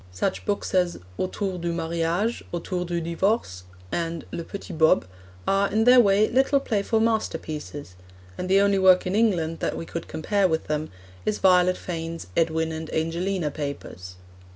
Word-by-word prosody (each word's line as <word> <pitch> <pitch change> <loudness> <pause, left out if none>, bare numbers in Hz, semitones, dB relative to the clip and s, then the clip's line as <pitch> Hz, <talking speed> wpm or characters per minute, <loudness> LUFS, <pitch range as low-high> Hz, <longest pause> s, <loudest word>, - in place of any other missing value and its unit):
Such 90 - -2
books 205 -1 -2
as 180 -2 +2 0.2
Autour 185 0 -2
du 170 0 -2
Mariage, 170 +6 -1
Autour 180 +1 -3
du 170 0 -2
Divorce, 170 - -1 0.3
and 165 -1 -3
Le 170 - -4
Petit 195 +2 -8
Bob, 160 - +4 0.4
are, 195 +1 +2
in 220 +2 +2
their 250 +2 +7
way, 205 -1 +5
little 270 +3 +3
playful 220 -3 0
masterpieces, 160 - -2 0.4
and 180 - -5
the 195 +1 +5
only 200 -1 +3
work 185 -1 +5
in 185 - -1
England 175 -8 +1
that - - -2
we - - -5
could 170 0 -6
compare 195 +5 +1
with 160 -2 -1
them 150 +1 -2 0.3
is 215 - 0
Violet 180 -1 +4
Fane's 165 -1 -5
Edwin 160 0 +1
and 160 0 -6
Angelina 165 +1 -1
Papers. 140 - -6
175 Hz, 160 wpm, -25 LUFS, 160-200 Hz, 0.4 s, their